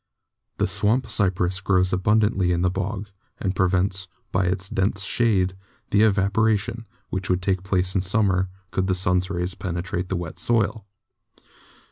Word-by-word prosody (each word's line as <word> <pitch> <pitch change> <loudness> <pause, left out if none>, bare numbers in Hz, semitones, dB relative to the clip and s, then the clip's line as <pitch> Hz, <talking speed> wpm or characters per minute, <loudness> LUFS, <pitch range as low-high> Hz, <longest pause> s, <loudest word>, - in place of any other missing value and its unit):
The - - +2
swamp 120 +5 +1
cypress 95 -2 +1
grows 95 -1 +2
abundantly 100 -1 +2
in 85 0 +1
the 90 - +2
bog, 100 +2 -4 0.3
and 95 -1 -2
prevents, 95 +1 +1 0.2
by 90 0 +1
its 90 +1 0
dense 95 +1 0
shade, 100 -5 +1 0.4
the 105 - +4
evaporation 110 +2 +1 0.2
which 95 0 -3
would 90 0 +1
take 95 -2 +1
place 95 -1 0
in 95 - +1
summer 95 -1 +2 0.2
could 95 +1 0
the 95 - +1
sun's 90 0 +1
rays 90 -1 -2
penetrate 90 -1 -3
to - - -17
the 95 - -2
wet 85 -2 -5
soil. 110 -2 0
95 Hz, 155 wpm, -24 LUFS, 90-100 Hz, 0.4 s, the